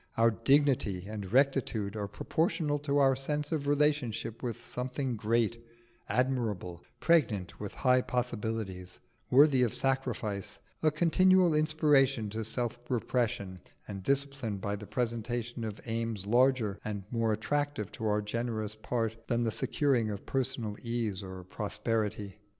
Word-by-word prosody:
Our 115 0 +5
dignity 115 -6 +2
and 105 -3 -6
rectitude 125 -6 +2
are 105 -2 -3
proportioned 145 - -1
to 140 -1 +1
our 135 -2 +5
sense 150 +3 -1
of 150 -3 -1
relationship 145 -6 +1
with 120 -3 -5
something 125 0 -3
great, 115 +1 0 0.5
admirable, 110 -9 -1 0.2
pregnant 115 - +2
with 105 -2 -6
high 130 -1 +4
possibilities, 110 -7 -3 0.3
worthy 135 0 +6
of 120 -3 +1
sacrifice, 120 -7 -1 0.2
a 155 - +4
continual 175 +3 +4
inspiration 145 -7 +3
to 110 +1 -3
self 120 +2 -1
repression 110 -6 -1 0.3
and 100 -2 -6
discipline 135 -3 -1
by 100 +1 -2
the 105 0 -9
presentation 120 0 -2
of 110 -2 -5
aims 115 -3 -2
larger 120 -2 +3
and 105 -2 -4
more 115 -2 +1
attractive 145 +1 -1
to 110 - -4
our 105 0 +1
generous 110 -1 -2
part 115 +1 -2
than 120 0 +1
the 115 - 0
securing 125 -3 +1
of 100 -2 -5
personal 125 -5 -1
ease 115 -5 -2
or 95 -1 -8
prosperity. 105 +1 -3
115 Hz, 135 wpm, -31 LUFS, 105-135 Hz, 0.5 s, worthy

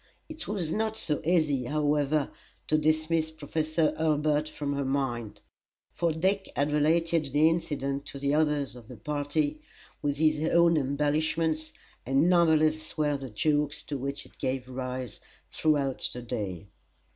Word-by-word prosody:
It 315 0 -7
was 185 -6 -2
not 220 +2 -1
so 150 -8 0
easy, 155 -6 +2
however, 150 0 +1 0.4
to 155 - +4
dismiss 155 +1 +1
Professor 155 +1 0
Hurlbut 155 -1 +1
from 145 -2 -3
her 140 0 -1
mind, 130 -5 -2 0.5
for 170 -1 0
Dick 190 +5 0
had 145 +1 +1
related 160 +2 +2
the 150 +3 +5
incident 145 -4 -1
to - - -7
the 140 +1 0
others 150 -4 +1
of 120 -3 -12
the 125 - -10
party, 145 +4 -1 0.4
with 145 -1 -1
his 155 +1 +2
own 170 -1 +5
embellishments, 155 +3 0 0.3
and 135 +5 +3
numberless 155 -3 +3
were 150 -1 +2
the 135 -2 -6
jokes 150 +6 0
to 145 - -4
which 140 +2 -4
it - - -21
gave 130 -1 -2
rise 130 -2 -5 0.3
throughout 145 -4 +1
the 125 - -7
day. 100 -6 -4
150 Hz, 145 wpm, -28 LUFS, 140-160 Hz, 0.5 s, the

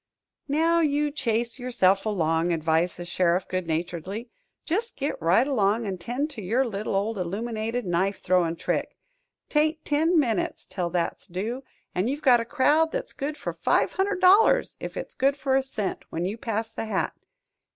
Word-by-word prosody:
"Now 325 +4 +3
you 295 -2 +1
chase 235 -3 -1
yourself 210 -5 +2
along," 165 -4 +1
advised 165 +1 +1
the 175 - -6
sheriff, 175 +1 +1
good 185 -2 -3
naturedly. 175 +8 -3 0.3
"Just 445 +8 -1
get 285 - -3
right 175 +9 +4
along, 225 -4 +1
an' 190 -3 -4
'tend 260 - -2
to 240 -7 -7
your 230 +8 +1
little 210 -3 -3
old 205 +2 -1
illuminated 220 +5 -3
knife 185 +3 0
throwin' 180 -3 +2
trick. - - -2 0.5
'Tain't 310 +1 +1
ten 320 +3 +3
minutes 230 -8 -1
till 185 -2 -3
that's 170 -1 -2
due, 220 +9 -4 0.3
an' 185 +5 0
you've 285 +4 -3
got 250 -4 +6
a - - -4
crowd 295 +5 +3
that's - - -4
good 290 +2 -4
for - - -4
five - - +1
hundred 385 0 0
dollars 390 +5 +5
if - - -6
it's - - -6
good 275 +2 +1
for 265 -1 +1
a 270 - +4
cent, 220 -7 -4
when 165 +2 -2
you 195 +4 -2
pass 225 -1 -3
the 225 - -4
hat. 210 -3 -1
225 Hz, 175 wpm, -26 LUFS, 185-280 Hz, 0.5 s, got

